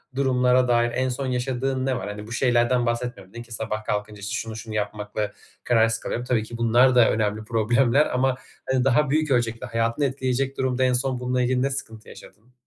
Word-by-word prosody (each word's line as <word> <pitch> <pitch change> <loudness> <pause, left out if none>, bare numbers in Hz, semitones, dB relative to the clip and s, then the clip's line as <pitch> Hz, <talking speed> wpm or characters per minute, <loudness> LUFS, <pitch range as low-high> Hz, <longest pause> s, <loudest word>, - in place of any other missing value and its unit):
durumlara 125 -2 +3
dair 120 0 +2
en 130 +1 0
son 130 +2 -3
yaşadığın 130 +1 -1
ne 130 -1 0
var? 95 - -5
Hani 105 +1 -7
bu - - -11
şeylerden 120 0 +2
bahsetmiyorum 120 -5 -3
nin 120 0 -7
ki 120 - -20
sabah 110 -1 -4
kalkınca 105 -1 -3
işte 100 +2 -5
şunu, 115 -1 -4
şunu 110 0 -7
yapmakla 105 0 -3 0.3
kararsız 115 -2 +2
kalıyorum. 120 - -4
Tabii 120 -3 +1
ki 115 +1 -8
bunlar 120 +3 +4
da 120 -2 +6
önemli 110 0 -1
problemler 120 +6 +2
ama 130 0 +2 0.4
hani 130 -1 +2
daha 135 +2 +3
büyük 155 0 +1
ölçekli, 115 -2 0
hayatını 115 +5 0
etkileyecek 135 0 -1
durumda 130 0 0
en 125 -1 +3
son 125 0 0
bunla 125 0 -1
ilgili 125 0 +1
ne 135 - +1
sıkıntı 110 -5 -6
yaşadın? 110 +6 -15
120 Hz, 200 wpm, -24 LUFS, 110-130 Hz, 0.4 s, da